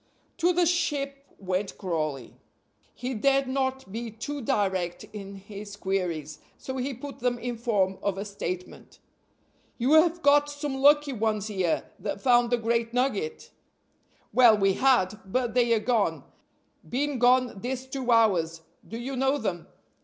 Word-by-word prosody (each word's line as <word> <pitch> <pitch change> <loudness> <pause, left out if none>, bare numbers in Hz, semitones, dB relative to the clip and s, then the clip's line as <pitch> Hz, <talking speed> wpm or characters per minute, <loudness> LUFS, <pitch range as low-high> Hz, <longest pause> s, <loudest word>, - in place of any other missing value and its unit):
To 350 +1 +3
the 355 0 +2
"Ship" 295 -5 0 0.2
went 190 +1 -3
Crawley. 155 -8 -3 0.6
He 250 +2 -4
dared 270 +4 +2
not 265 -3 -2
be 230 +2 -4
too 275 +7 -6
direct 190 -6 -1
in 200 -1 -8
his 200 +1 -9
queries, 175 -7 -3 0.2
so 260 0 -6
he 260 +2 -2
put 275 +3 -9
them 245 0 0
in 240 0 -4
form 205 -5 0
of 200 -2 -1
a 200 - -4
statement. 185 -3 -6 0.8
"You 255 +5 +2
have 335 +2 +4
got 290 +1 +5
some 290 -1 -4
lucky 290 +1 +4
ones 215 -3 -1
here, 185 -5 0 0.2
that - - -4
found 240 -2 +4
the 245 - +2
great 230 0 -1
nugget?" 395 - -1 0.8
"Well, 240 -4 +7
we 195 -1 +3
had! 220 -5 +2
But 235 +4 -1
they 240 -1 +3
are - - +1
gone 220 -1 0 0.7
been 275 +1 -1
gone 250 -3 +3
this 255 +1 -3
two 260 -1 -5
hours. 180 -9 +3 0.3
Do 225 - -6
you 260 +3 -5
know 270 +2 +2
them?" 185 - -3
235 Hz, 155 wpm, -27 LUFS, 200-270 Hz, 0.8 s, Well